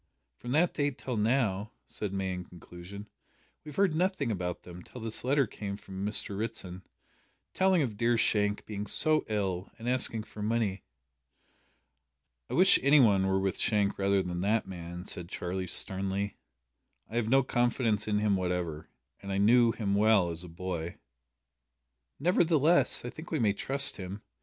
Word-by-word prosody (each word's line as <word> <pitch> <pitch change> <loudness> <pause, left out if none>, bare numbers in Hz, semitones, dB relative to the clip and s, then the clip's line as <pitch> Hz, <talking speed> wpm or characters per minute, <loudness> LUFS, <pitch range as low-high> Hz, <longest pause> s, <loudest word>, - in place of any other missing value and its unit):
"From 120 - -9
that 165 +4 +3
date 145 -3 -1
till 125 - -4
now," 105 -3 0
said 105 -3 -5
May 95 -1 -2
in 90 0 -5
conclusion, 90 +4 -11 0.6
"we 155 - -9
have 150 - -10
heard 195 -4 +3
nothing 165 - 0
about 90 -3 -3
them 90 0 -10
till 125 - -11
this 110 -1 -3
letter 140 +2 +3
came 100 -2 -6
from 95 -1 -8
Mr 105 -1 +2
Ritson, 95 -4 -5 0.7
telling 190 -4 +3
of 110 -6 -4
dear 115 +1 +2
Shank 105 -2 +1
being 105 -1 -5
so 155 +6 +2
ill, 95 -4 -2
and 115 - -8
asking 125 -3 0
for 105 - -10
money." 105 -3 0 1.7
"I - - -3
wish 185 +3 +6
any 140 +3 +5
one 100 -6 +4
were 95 0 +2
with 95 -1 -1
Shank 105 -3 +1
rather 100 0 +2
than 90 0 -4
that 105 +3 +1
man," 85 -1 -7
said 85 -3 -4
Charlie 90 +1 -4
sternly; 95 +2 -1 0.7
"I 110 - -9
have 115 -2 0
no 135 +2 +5
confidence 120 -4 0
in 105 -1 +1
him 105 -1 +2
whatever, 90 -4 -3 0.3
and 100 - -6
I 95 - -1
knew 115 +3 +5
him 105 -3 -2
well 100 -4 +4
as 85 +1 -6
a 90 - -10
boy." 85 -1 -5 1.2
"Nevertheless, 160 -4 +3
I 120 - -4
think 160 +3 -10
we 160 - -1
may 110 -6 +2
trust 135 +6 +2
him. 95 +2 -7
105 Hz, 170 wpm, -30 LUFS, 95-120 Hz, 1.7 s, wish